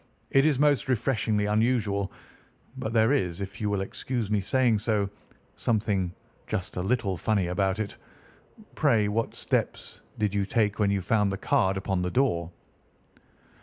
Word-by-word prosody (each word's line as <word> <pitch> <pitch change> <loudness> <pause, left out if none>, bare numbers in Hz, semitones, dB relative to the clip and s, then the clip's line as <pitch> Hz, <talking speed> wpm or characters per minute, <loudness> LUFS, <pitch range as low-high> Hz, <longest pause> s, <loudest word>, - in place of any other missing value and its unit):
It 135 +2 +5
is 150 -4 +2
most 145 -1 +2
refreshingly 110 -4 +1
unusual. 105 -2 +1 0.6
But 125 -4 -4
there 115 +3 +4
is, 90 -10 0
if 100 +4 -6
you 105 - 0
will 100 -2 0
excuse 115 +2 -3
my 105 - +3
saying 120 +2 +2
so, 105 -2 0 0.5
something 100 -5 0 0.4
just 95 -5 -3
a - - 0
little 100 -2 0
funny 105 -2 +1
about 95 +1 0
it. 110 -2 -4 0.8
Pray 115 -9 +3
what 115 +2 -1
steps - - -2 0.2
did 105 -2 0
you 100 -1 +1
take 105 -1 0
when 105 -2 +3
you 100 -1 +1
found 105 0 +2
the 95 - -3
card 95 -1 +1
upon 95 -1 -1
the 90 - -1
door?" 90 -8 +1
105 Hz, 160 wpm, -27 LUFS, 95-115 Hz, 0.8 s, It